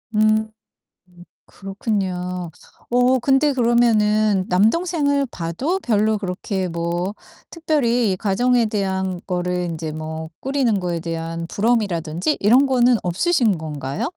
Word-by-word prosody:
음. - - +2
음 215 0 +2 1.0
그렇군요. 185 -3 -4 0.4
어 250 +1 +3
근데 270 +4 +3
그러면은 215 -5 +2
남동생을 285 - +2
봐도 250 - -2
별로 215 - +1
그렇게 190 0 -3
뭐 170 +3 -2 0.4
특별히 245 - +1
가정에 235 +4 +2
대한 190 -3 -2
거를 180 0 -1
인제 160 -2 -4
뭐 160 +1 -6
꾸리는 260 -7 0
거에 175 -2 -2
대한 165 0 -4
부러움이라든지 200 - 0
이런 245 +7 +5
거는 250 -2 +4
없으신 215 - +1
건가요? 150 - -4
205 Hz, 265 characters per minute, -21 LUFS, 180-245 Hz, 1.0 s, 이런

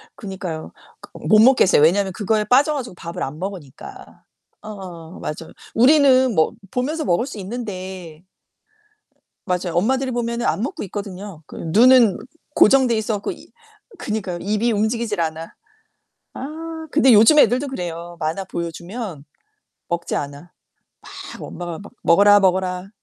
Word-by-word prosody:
그니까요. 185 -5 -6 0.3
그 - - -13 0.2
못 215 0 +6
먹게 255 +2 +6
했어요. 165 - +4
왜냐면 190 +5 +3
그거에 215 +1 0
빠져 270 +8 +3
가지고 245 -9 -5
밥을 170 0 -6
안 150 +4 -6
먹으니까. 185 -8 -9 0.4
응 - - -7 0.5
맞아요. 160 +2 -6 0.2
우리는 260 0 +5
뭐 160 - +3 0.2
보면서 300 +5 -2
먹을 175 +4 +1
수 240 - -8
있는데 185 -6 -7 1.2
맞아요. 180 -2 -2
엄마들이 260 +8 +1
보면은 235 0 -2
안 - - 0
먹고 255 - -4
있거든요. 195 -3 -7
그 - - -13
눈은 225 +5 +5 0.4
고정돼 255 0 +5
있어 220 0 -1
갖고 200 - -4
이 - - -13 0.5
그니까요. 200 -5 -4
입이 215 +4 0
움직이질 220 -2 -1
않아. 160 0 -4 0.8
아 320 +3 -7
근데 265 -4 +5
요즘 225 +8 +7
애들도 265 +1 +4
그래요. 175 -7 -6
만화 160 +5 -2
보여주면 170 - -6 0.7
먹지 170 -1 -2
않아. 145 +5 -6 0.9
막 - - -13
엄마가 175 -2 -7
막 205 - -13
"먹어라, 205 +4 +6
먹어라." 185 -1 0
205 Hz, 310 characters per minute, -21 LUFS, 175-245 Hz, 1.2 s, 요즘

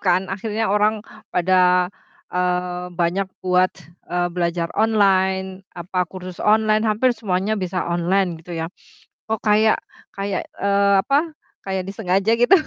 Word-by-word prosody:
kan 185 0 +2
akhirnya 215 +3 -2
orang 210 +1 +2 0.2
pada, 180 0 +3 0.4
eee, 180 0 -1
banyak 180 +2 -1 0.2
buat, 185 0 +4 0.4
eee, 175 0 0
belajar 170 -1 -1
online, 190 -3 +2 0.2
apa, 180 0 -2
kursus 185 -1 -9
online, 215 0 +3
hampir 235 +4 +2
semuanya 205 -3 -1
bisa 185 -3 -2
online 175 0 0
gitu 170 +1 -8
ya. 165 +2 -4 0.5
Kok 220 -1 -2
kayak 215 +1 +4 0.3
kayak 195 -1 -3 0.2
eee, 200 0 +3
apa, 295 - +1 0.3
kayak 190 -1 -3
disengaja 195 +1 +1
gitu, 240 +7 +2
190 Hz, 130 wpm, -21 LUFS, 180-210 Hz, 0.5 s, buat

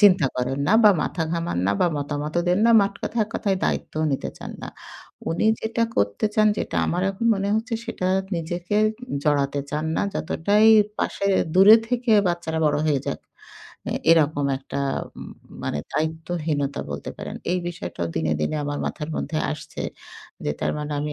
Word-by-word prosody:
চিন্তা 190 -7 +6
করেন 130 +2 -1
না 215 - +5
বা, 210 - +9
মাথা 165 +1 -2
ঘামান 170 - -2
না 100 - +3
বা, - - +4
মতামতও 145 +3 -2
দেন 180 +3 +3
না। - - +5
মাঠকথায় 205 +3 -1
এক 215 - -18
কথায় 195 -3 0
দায়িত্ব - - -2 0.2
নিতে - - -2
চান - - -7
না। - - -5 0.6
উনি 170 +6 +1
যেটা 230 +1 -1
করতে 100 - +1
চান 215 0 +4
যেটা - - -3
আমার 180 +2 -1
এখন 195 +4 -3
মনে 195 0 -2
হচ্ছে, 230 +1 -2
সেটা 185 - -3 0.3
নিজেকে 175 +4 -3
উ - - -7 0.3
জড়াতে 140 -1 +1
চান 155 +1 -2
না। - - +1
যতটাই 205 +8 +2 0.3
পাশে 200 - -1 0.3
দূরে 200 +4 +9
থেকে 245 -1 -1 0.2
বাচ্চারা 170 -2 -2
বড় 145 0 +2
হয়ে 145 -3 +2
যাক। - - -2 0.7
এ - - -1 0.2
এরকম 150 -3 +2
একটা 140 +1 -5 0.4
ম - - -10 0.3
মানে 75 - -2
দায়িত্বহীনতা 155 -2 -2
বলতে 70 0 -5
পারেন। - - -6 0.2
এই 180 - +1
বিষয়টাও 85 - -5
দিনে, 80 -1 +1
দিনে 115 - -1
আমার 145 0 -3
মাথার 150 +1 -4
মধ্যে 155 +2 -2
আসছে। 155 0 -7 0.6
যে - - 0
তার - - 0
মানে 150 0 -4
আমি 150 0 -3
160 Hz, 175 wpm, -23 LUFS, 145-195 Hz, 0.7 s, বা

